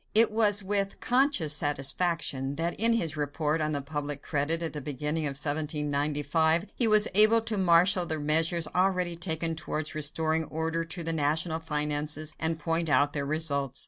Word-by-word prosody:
It 225 0 +6
was 210 -2 +1
with 200 0 -1
conscious 250 - +1
satisfaction 145 -1 -1
that 170 +2 -2
in 230 +2 +3
his 165 -9 0
report 150 +1 -2
on 155 0 -1
the 145 -2 -2
public 145 -1 -4
credit 160 +3 -1
at 165 - -4
the 150 - -5
beginning 150 +3 -3
of 140 -2 -3
1795 150 +2 0
he 240 - +3
was 215 -1 +5
able 215 +3 +6
to 225 -1 -3
marshal 180 0 +3
the 160 -1 -2
measures 160 +2 +2
already 180 -2 0
taken 165 -1 -2
towards 155 0 -4
restoring 160 +1 -1
order 160 +1 -3
to 165 +1 -6
the 165 0 -2
national 160 +2 -1
finances 150 0 -2
and 160 0 -1
point 165 +1 -2
out 145 +2 +2
their 140 -3 -3
results. 140 -3 -1
160 Hz, 170 wpm, -27 LUFS, 150-175 Hz, -, It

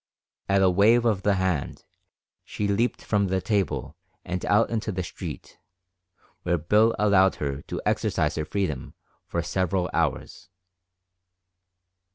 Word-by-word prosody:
At 100 0 +3
a 95 - +5
wave 110 +6 +4
of 105 -5 +1
the 100 0 +2
hand 95 -6 -2 0.6
she 105 - -3
leaped 110 +5 0
from 100 -2 +1
the 95 0 0
table 100 -3 -1 0.3
and 90 +1 -4
out 105 +3 +3
into 110 -1 -2
the 90 -1 -3
street, 85 - -8 0.8
where 85 - 0
Bill 105 +8 +3
allowed 100 -3 +4
her 70 -1 -4
to - - -6
exercise - - 0
her 75 - -3
freedom 75 -9 -3 0.3
for - - -2
several 95 -1 -1
hours. 90 - -2
95 Hz, 135 wpm, -25 LUFS, 90-105 Hz, 0.8 s, a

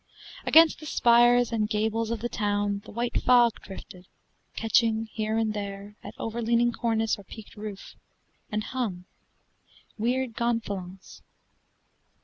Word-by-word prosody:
Against 325 0 +6
the 310 - -9
spires 240 -1 +4
and 215 -2 0
gables 220 +1 -1
of 230 -2 -3
the 240 - -1
town 205 -2 -1
The - - -11
white 235 +2 -2
fog 240 -2 +4
drifted, 185 -1 -11 0.5
catching 225 0 +2
here 220 0 -1
and 220 -1 0
there 200 0 -6
At - - -9
overleaning 235 +1 0
cornice 225 -2 0
or - - -11
peaked 215 +2 -12
roof, 210 -2 -8 0.6
And 215 0 -1
hung 210 -9 -4 0.9
weird 250 +2 0
gonfalons. 200 -6 -4
225 Hz, 125 wpm, -27 LUFS, 205-235 Hz, 0.9 s, Against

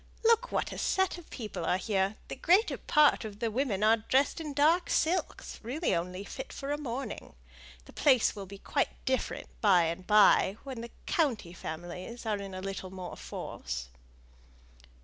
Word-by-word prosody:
Look 465 +2 +4
what - - -1
a - - -6
set 380 -2 +1
of 340 - -15
people 220 -5 -5
are 180 - +2
here: 195 0 0
the - - -5
greater 365 - +3
part 300 -5 +4
of 210 -2 -7
the 225 +1 -1
women 220 -4 0
are 220 +1 +6
dressed 265 +8 +1
in 305 -2 -4
dark 315 +5 +3
silks, 345 +4 0
really 260 - -1
only 180 +3 -2
fit 265 +6 -7
for 275 +1 -5
a 290 - 0
morning. 255 - -5 0.5
The - - -15
place 255 -7 +4
will 200 -2 -7
be 200 +1 -9
quite - - -2
different, 260 -2 -1
by 190 -5 +5
and 170 +3 -3
by, 210 -1 +5
when 260 -4 -6
the 235 - -7 0.2
county 240 - 0
families 175 +8 -7
are 215 -2 0
in 195 -1 -7
a 185 - -5
little 195 -1 -5
more 185 -1 -7
force." 60 +1 -6
220 Hz, 175 wpm, -30 LUFS, 190-285 Hz, 0.5 s, are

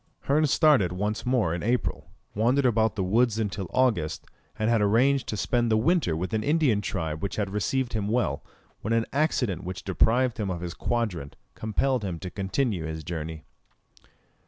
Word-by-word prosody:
Hearn 150 +2 +2
started 140 - +4
once 105 +6 -3
more 120 -10 +2
in 85 - -3
April, 120 +5 -1 0.2
wandered 125 +6 +2
about 110 -3 +2
the 100 - -1
woods 110 +4 +2
until 100 -4 -3
August, 110 -12 0 0.3
and 110 0 0
had 115 -2 +3
arranged 125 +7 +3
to 105 - -3
spend 120 +2 +1
the 110 - +3
winter 140 - +2
with 90 +5 -4
an 110 -1 0
Indian 145 -7 +2
tribe 80 -6 -3
which 100 - -3
had 100 -3 -2
received 125 +5 -1
him 105 -3 -1
well, 120 +3 0 0.4
when 110 - -1
an 115 0 +2
accident 125 - 0
which 90 0 -6
deprived 115 +5 +2
him 105 -2 -1
of 85 -2 -3
his 85 -1 -4
quadrant 95 -13 -2 0.2
compelled 120 +3 0
him 90 -4 -3
to 90 +2 -7
continue 95 -2 -1
his 80 0 -5
journey. 80 -1 -5
110 Hz, 180 wpm, -26 LUFS, 95-125 Hz, 0.4 s, started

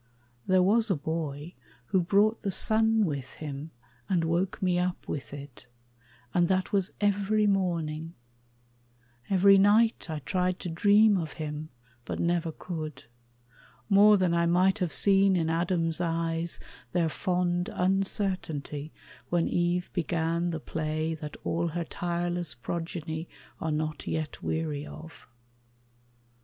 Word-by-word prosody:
There 185 -1 +4
was 220 +4 +3
a 190 - +3
boy 155 +1 -4 0.4
who 190 -2 +3
brought 205 +5 +2
The 200 - -2
sun 220 +2 +4
with 140 -5 -4
him 150 0 -6 0.4
and 175 -3 +2
woke 170 +3 0
me 180 -2 +1
up 180 0 -2
with 140 - -5
it, 140 -3 -10 0.7
And 175 -1 +3
that 185 +2 0
was 195 -2 +1
every 205 +1 +2
morning; 170 -5 -1 1.1
every 195 0 +6
night 210 0 +3
I 155 - -2
tried 180 +5 -1
to 180 - -4
dream 205 +4 +4
of 160 -3 -5
him, 155 0 -5 0.3
but - - -5
never 170 -1 0
could, 155 -2 -6 0.9
More 205 +1 +7
than 185 -3 +1
I 170 0 +2
might 185 +4 +3
have 180 -4 -1
seen 195 -1 +4
in 165 -2 +1
Adam's 165 0 0
eyes 165 0 -1 0.3
Their 170 -2 +2
fond 175 +1 -1
uncertainty 180 -6 -1 0.4
when 170 -1 +1
Eve 175 +1 0
began 170 0 0
The 165 -2 -3
play 155 +1 -2
that 150 -2 -7
all 170 +1 0
her 170 +1 -2
tireless 175 0 -3
progeny 165 +3 -5 0.3
Are 160 - -2
not 155 0 -3
yet 155 -2 -3
weary 155 -3 -2
of. 155 0 -11
175 Hz, 135 wpm, -28 LUFS, 160-190 Hz, 1.1 s, More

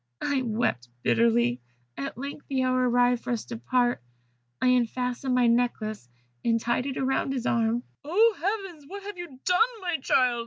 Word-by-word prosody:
I 280 -2 +1
wept 215 - -1
bitterly. 120 +1 +3 0.3
At 140 +8 -5
length 280 +2 -7
the 265 -2 0
hour 255 0 +2
arrived 245 0 +3
for - - -6
us 235 -2 -2
to 235 - -6
part, 245 +1 +1 0.6
I 255 - +3
unfastened 250 +1 +1
my 250 -1 +4
necklace, 230 - 0 0.3
and 230 -1 +2
tied 240 +3 0
it 270 - -3
round 270 0 0
his 255 -2 -3
arm 230 +1 +1
" - - -46
"Oh, 420 +9 +4
heavens! 385 -5 -3
what 400 +4 -8
have 405 -2 -7
you 310 -7 -8
done, 360 0 +3 0.2
my 350 -3 -1
child?" 250 -2 +2
250 Hz, 180 wpm, -27 LUFS, 230-280 Hz, 0.6 s, my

